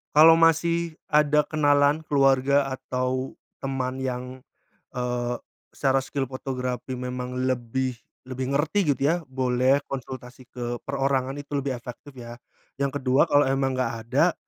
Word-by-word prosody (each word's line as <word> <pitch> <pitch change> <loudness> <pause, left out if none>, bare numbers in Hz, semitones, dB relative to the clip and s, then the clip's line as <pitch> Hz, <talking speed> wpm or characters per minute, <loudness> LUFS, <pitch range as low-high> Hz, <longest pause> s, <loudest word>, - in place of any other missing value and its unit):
Kalo 160 +2 +9
masih 165 0 +2
ada 150 0 +3
kenalan, 145 0 +3
keluarga, 140 0 +4
atau 130 0 -3 0.2
teman 130 -1 -3
yang, 125 0 -4 0.5
eee, 125 -1 -2 0.3
secara 135 -1 +1
skill 135 +1 -3
fotografi 130 -1 -4
memang 125 0 -4
lebih, 130 +1 -1 0.3
lebih 130 0 -4
ngerti 160 +7 0
gitu - - -14
ya, 160 +4 +4
boleh 130 0 +2
konsultasi 130 -1 -8
ke 120 -1 -5
perorangan 135 0 0
itu 145 0 -8
lebih 140 -2 -1
efektif 125 +3 -11
ya. 120 -1 -8 0.5
Yang 140 0 0
kedua, 130 +1 +3
kalo 145 0 +5
emang 135 -1 0
nggak 130 - 0 0.2
ada, 155 +7 +3
130 Hz, 135 wpm, -25 LUFS, 125-145 Hz, 0.5 s, Kalo